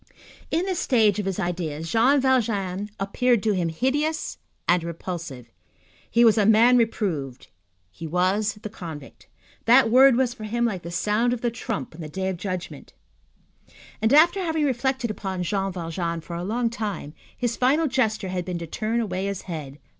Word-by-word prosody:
In 335 +3 0
this 375 -3 -1
stage 215 -5 +3
of 200 - -2
his 195 0 -2
ideas, 165 -3 -3
Jean 255 +6 +4
Valjean 210 -7 0
appeared 225 +3 +1
to 220 - +2
him 175 -3 0
hideous 295 - -1 0.3
and 175 -1 +3
repulsive. 165 -7 -6 0.6
He 235 +1 +4
was 225 -1 +5
a 205 - +3
man 230 +3 +6
reproved, 175 - -1 0.4
he 160 - -8
was 190 +6 +1
the 215 - -4
convict. 160 -9 -10 0.4
That 240 0 +6
word 260 +1 +7
was 250 -1 +1
for 220 -4 -8
him 235 +3 0
like 195 -6 -2
the 170 - -7
sound 210 +7 +1
of 240 - -4
the 240 - 0
trump 225 -4 -5
on 165 - -10
the 155 - -6
Day 190 +4 -2
of 185 - -3
Judgment; 185 -1 -6 1.1
and, 220 +1 +2
after 330 +7 +6
having 320 -3 0
reflected 260 -2 0
upon 190 -3 -4
Jean 195 +2 -1
Valjean 170 -1 -3
for 170 +1 -8
a 170 - -4
long 230 +4 -1
time, 205 -10 -4 0.2
his 240 -2 -1
final 280 +6 +2
gesture 220 -8 0
had 180 -1 -2
been 180 -1 -4
to 170 - -5
turn 220 +7 -2
away 190 -3 -2
his 200 -2 -4
head. 150 -6 -7
210 Hz, 180 wpm, -24 LUFS, 175-240 Hz, 1.1 s, word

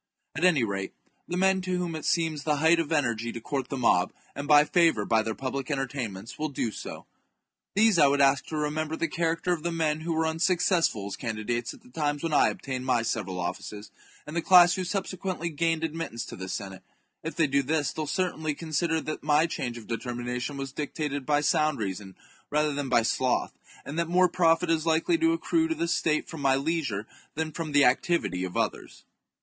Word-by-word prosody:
At 160 - -3
any 170 -9 +5
rate, 100 -3 -3 0.3
the 175 - -3
men 190 0 +3
to 185 0 -2
whom 175 -2 -2
it 155 - -6
seems 160 -3 0
the 150 0 +1
height 160 +3 +4
of 165 -1 -2
energy 120 -7 0
to - - -5
court 135 +2 -3
the 135 - -3
mob, 90 -8 +3 0.2
and 140 0 -6
buy 150 0 +7
favour 165 -12 +3
by 115 -1 +3
their 110 0 -3
public 135 0 -4
entertainments, 125 -7 -4
will 155 0 -1
do 120 -5 -2
so. - - -8 0.7
These 210 -3 +4
I 145 - +7
would 140 +1 +2
ask 140 0 +3
to 155 - -4
remember 155 +1 -1
the 165 - -1
character 165 +2 0
of 165 - -4
the 170 +2 -2
men 155 -2 0
who 165 +1 -2
were 160 0 +1
un 160 0 -2
successful 175 - +2
as 100 - -4
candidates 115 +1 -3
at - - -20
the - - -17
times 145 +2 -2
when 165 -2 -1
I - - +5
obtained 130 -2 -5
my 125 -3 +1
several 95 -5 -2
offices, 105 +4 -5 0.3
and 150 - -8
the 170 - +1
class 175 0 +7
who 185 - -2
subsequently 185 -2 -3
gained 165 +1 0
admittance 160 -7 -3
to - - -8
the 95 0 -7
Senate; 95 -1 -5 0.4
if 160 - -5
they 165 - +3
do 140 0 +2
this 145 +1 0
they 160 - -4
will 155 - -3
certainly 160 -2 -1
consider 160 +1 -1
that 155 - -5
my 150 +1 +3
change 125 -7 -4
of 115 - -10
determina 120 +1 -4
tion 140 +3 -4
was 135 -1 -5
dictated 145 -1 -4
by 145 -1 +3
sound 155 0 +2
reason 95 -2 -5 0.3
rather 150 0 +1
than 140 -1 -3
by 120 -2 +4
sloth, 130 +2 0 0.3
and 150 +4 -4
that 170 -1 -1
more 180 +1 +5
profit 170 -1 +2
is 160 -1 +1
likely 165 - +2
to 330 0 +3
accrue 330 0 +1
to 325 - -1
the 170 - -1
state 160 -2 +1
from 160 -3 -8
my 135 -1 +3
leisure 140 -8 -1 0.3
than 160 0 -2
from 160 -1 -5
the 145 -1 +5
activity 125 - +1
of 90 -1 -4
others. - - -3
150 Hz, 215 wpm, -27 LUFS, 125-165 Hz, 0.7 s, buy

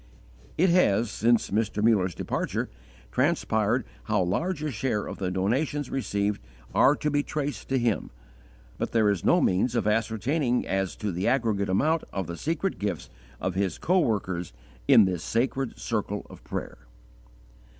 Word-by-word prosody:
It 180 +2 +4
has, 115 - +3
since 115 +1 +2
Mr. 105 0 0
Muller's 95 -6 +3
departure, - - -2 0.4
transpired 125 -5 +1 0.2
how 105 -3 +2
large 155 - -1
a 150 - -1
share 110 -3 -1
of - - -7
the 95 -2 -1
donations 125 +10 -1
received 105 -6 -1 0.3
are 140 - +5
to 150 - -1
be 145 0 +2
traced 145 0 -4
to 135 - +2
him; 115 -8 0 0.7
but - - -3
there 110 -3 +4
is 100 -5 -2
no - - +4
means 100 +7 +2
of 115 - +1
ascertaining 120 +5 +1
as 95 -1 -1
to 105 -2 -3
the 90 +3 -2
aggregate 115 -6 +1
amount 155 - +2
of 95 -2 -3
the 85 - -5
secret 165 - -2
gifts 100 0 -3 0.3
of 95 - -2
his 95 0 -1
coworkers 100 - 0 0.3
in 110 - +8
this 90 -3 -2
sacred 130 +2 -1
circle 105 -3 -3
of - - -13
prayer. - - -5
110 Hz, 155 wpm, -27 LUFS, 100-135 Hz, 0.7 s, in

